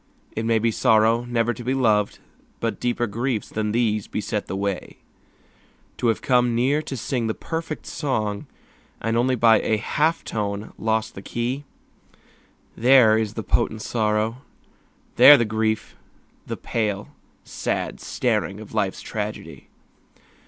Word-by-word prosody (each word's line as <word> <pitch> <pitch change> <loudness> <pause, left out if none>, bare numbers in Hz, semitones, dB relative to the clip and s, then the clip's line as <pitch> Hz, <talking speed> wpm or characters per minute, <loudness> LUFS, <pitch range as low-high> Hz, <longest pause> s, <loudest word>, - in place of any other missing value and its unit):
It 110 - -2
may 115 0 +3
be 115 +1 +1
sorrow 115 0 +3
never 120 -1 0
to 120 - -9
be 130 +3 0
loved, 105 -6 +2 0.4
But - - -2
deeper 120 0 0
griefs 115 +1 -2
than 105 -1 -2
these 110 -3 0
beset 105 0 -3
the - - -4
way. 100 -1 -3 1.0
To 120 - 0
have 115 - 0
come 125 -2 +3
near 135 +6 +2
to 140 -3 -6
sing 115 0 -2
the 110 - -2
perfect 160 -1 -5
song 110 -8 -2 0.5
And 115 0 -1
only 125 +2 +2
by 115 -2 +5
a 110 - +1
half 155 +9 0
tone 105 -1 -4
lost 110 0 0
the 95 - -9
key, 125 +7 -3 1.1
There 120 -2 +6
is 110 -1 -1
the 110 - -4
potent 110 -1 0
sorrow, 110 0 0 0.8
there 145 0 +10
the 120 - +1
grief, 110 0 -1 0.5
The - - -4
pale, 105 -3 -2 0.3
sad - - -3
staring 100 +2 -1
of 110 -1 -11
life's 100 -3 -1
tragedy. - - -6
115 Hz, 145 wpm, -23 LUFS, 110-120 Hz, 1.1 s, there